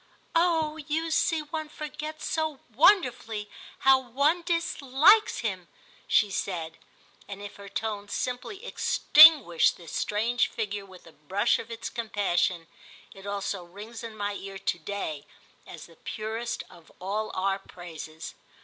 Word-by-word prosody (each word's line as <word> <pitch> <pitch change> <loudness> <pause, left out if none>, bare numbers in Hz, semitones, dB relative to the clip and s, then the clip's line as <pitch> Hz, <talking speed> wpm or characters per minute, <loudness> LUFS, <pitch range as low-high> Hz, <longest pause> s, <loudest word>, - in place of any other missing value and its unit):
"Oh 325 -2 +2
you 320 +2 -2
see 315 0 +1
one 310 +1 -5
forgets 305 0 -7
so 315 -5 -1
wonderfully 235 - +3 0.3
how 265 0 +6
one 280 +7 +1
dislikes 335 - +3
him!" 190 -6 -3 0.4
she 210 -2 +3
said; 165 -4 -4 0.5
and 200 0 -7
if 205 0 -9
her 200 0 -11
tone 205 0 -4
simply 380 - -4
extinguished 300 - +6
his 170 -3 -11
strange 230 +3 0
figure 205 -2 -4
with 185 -2 -15
the 165 - -15
brush 175 +7 0
of 230 - -8
its 230 0 -5
compassion, 190 -7 0 0.5
it 195 +1 -12
also 200 -2 -3
rings 205 +7 -10
in 225 -2 -8
my 205 0 -2
ear 195 -1 -7
to 175 - -2
day 155 -5 -5 0.4
as - - -10
the - - -19
purest 225 +2 -4
of 165 -2 -18
all 210 +4 -2
our 195 +1 0
praises. 165 -4 -9
215 Hz, 140 wpm, -27 LUFS, 195-300 Hz, 0.5 s, how